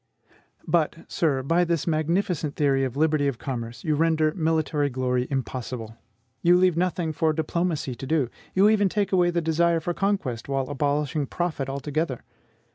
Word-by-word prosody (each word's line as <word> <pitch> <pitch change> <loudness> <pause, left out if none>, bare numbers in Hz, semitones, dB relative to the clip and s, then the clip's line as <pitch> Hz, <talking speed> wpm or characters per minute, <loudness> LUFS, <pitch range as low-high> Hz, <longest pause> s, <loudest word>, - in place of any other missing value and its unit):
But, 165 -3 +2
sir, 140 -6 0
by 165 +6 +2
this 170 -3 0
magnificent 165 -1 0
theory 135 -2 +2
of 130 0 -3
liberty 155 -2 +2
of 135 -4 -1
commerce 120 -2 -5
you 155 - +1
render 155 0 +2
military 155 -4 0
glory 125 -1 -1
impossible, 125 -4 -4 0.5
you 175 +1 +5
leave 180 -2 +3
nothing 175 -2 0
for 160 0 +1
diplomacy 160 -3 -1
to 130 +3 -8
do; 150 -4 +1 0.3
you 195 +2 +6
even 210 -2 +3
take 200 0 -1
away 180 -2 +4
the 170 0 0
desire 165 +1 +2
for 175 +2 -2
conquest, 170 - -2
while 135 -1 -1
abolishing 145 +1 -1
profit 155 -6 -2
altogether. 140 0 -2
155 Hz, 160 wpm, -25 LUFS, 135-170 Hz, 0.5 s, you